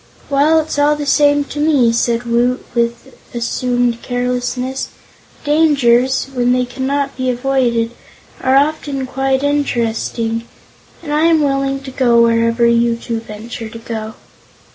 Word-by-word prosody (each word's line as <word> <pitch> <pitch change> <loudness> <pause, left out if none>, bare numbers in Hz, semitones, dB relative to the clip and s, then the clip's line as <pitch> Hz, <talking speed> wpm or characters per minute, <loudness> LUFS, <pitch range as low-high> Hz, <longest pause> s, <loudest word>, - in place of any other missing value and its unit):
"Well, 300 +3 +4
it's 315 -2 -3
all 295 +1 +3
the 295 0 -4
same 290 0 +3
to 290 +1 -7
me," 290 -6 +3
said 235 0 0
Woot, 240 +2 0
with 235 +2 -2 0.2
assumed 245 0 -1
carelessness. 250 +1 -2 0.6
"Dangers, 275 -5 +3
when 245 -1 +2
they 250 0 +1
cannot 270 +3 -2
be 255 0 -1
avoided, 245 -2 0 0.5
are 260 0 +2
often 285 -1 0
quite 270 +1 -1
interesting, 230 -4 -1 0.6
and 295 -2 -4
I 305 +2 +2
am 325 -2 +4
willing 275 -1 0
to 265 - -8
go 240 -3 +3
wherever 230 0 +2
you 235 0 +3
two 230 0 -4
venture 225 +1 -8
to 230 - -9
go." 220 -1 -6
250 Hz, 140 wpm, -16 LUFS, 235-280 Hz, 0.6 s, Well